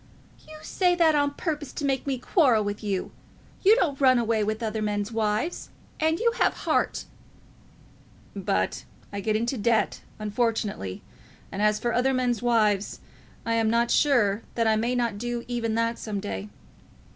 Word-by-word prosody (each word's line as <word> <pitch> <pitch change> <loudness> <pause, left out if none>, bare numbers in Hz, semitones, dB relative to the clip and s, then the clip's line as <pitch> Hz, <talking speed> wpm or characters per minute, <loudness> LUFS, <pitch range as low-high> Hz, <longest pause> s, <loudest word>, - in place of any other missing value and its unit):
"You 310 - -10
say 360 -2 +1
that 330 -2 +4
on 285 -1 +1
purpose 300 -5 -3
to 290 - -3
make 270 0 -1
me 270 -2 0
quarrel 250 - +3
with 205 +1 -4
you. 195 -3 -2 0.5
You 415 +3 +7
don't 295 - 0
run 255 -2 +6
away 225 -2 +1
with 215 +2 -2
other 220 -1 -2
men's 205 0 -2
wives, 220 +8 -1 0.3
and 320 +1 +1
you 470 0 +3
have - - +3
heart." - - 0 1.3
"But - - -1 0.3
I 200 - -3
get 215 +2 0
into 235 +3 -1
debt, 225 +1 +1 0.2
unfortunately; 215 - -2 0.5
and 195 - -4
as 210 0 +3
for 235 +2 -2
other 260 +2 +2
men's 245 -3 0
wives, 215 -4 +1 0.5
I 230 - 0
am 225 -1 +2
not 235 +1 +2
sure 230 -8 +3
that 230 - +1
I 220 -1 +4
may 235 +3 0
not 235 -4 -1
do 240 0 -3
even 230 -2 -2
that 230 0 0
some 210 -2 -4
day. 100 - -5
230 Hz, 170 wpm, -26 LUFS, 215-265 Hz, 1.3 s, You